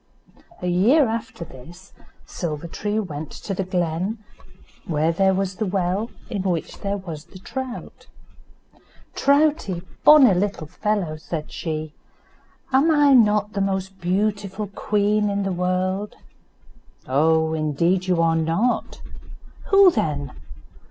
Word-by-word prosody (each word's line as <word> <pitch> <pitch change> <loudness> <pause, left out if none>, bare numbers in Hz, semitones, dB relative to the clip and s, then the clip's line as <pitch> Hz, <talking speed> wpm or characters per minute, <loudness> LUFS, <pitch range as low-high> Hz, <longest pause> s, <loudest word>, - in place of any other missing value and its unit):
A - - -1
year 230 - +4
after 220 -6 -4
this 170 +8 -14 0.3
Silver 160 -2 -5
tree 205 +5 -3
went 155 -7 -5
to 200 - -5
the 195 - -2
glen, 180 +3 -2 0.7
where 160 0 +1
there 190 +3 +2
was 190 -1 -2
the 220 - -1
well 190 +3 -1 0.2
in 205 -5 -3
which 180 -4 -3
there 200 0 -2
was 165 -6 -8
the 180 - -14
trout. 255 +6 -7 1.1
"Troutie, 280 - +2 0.2
bonny 285 -8 +8
little 185 -3 -1
fellow," 190 -2 -2
said 155 0 -6
she, 155 -2 -4 0.8
"am 270 +4 +4 0.4
not 210 -1 +1
I - - -21
the 200 - -1
most 190 -1 -2
beautiful 200 +2 -1
queen 210 +1 0
in 200 0 -1
the 195 - -1
world?" 185 +3 -1 0.9
"Oh! 160 +4 +2
indeed 170 +4 0
you 175 -2 +2
are 165 0 +3
not." 165 +10 -1 0.6
"Who 390 -2 +7
then?" 150 - -2
190 Hz, 125 wpm, -22 LUFS, 165-210 Hz, 1.1 s, bonny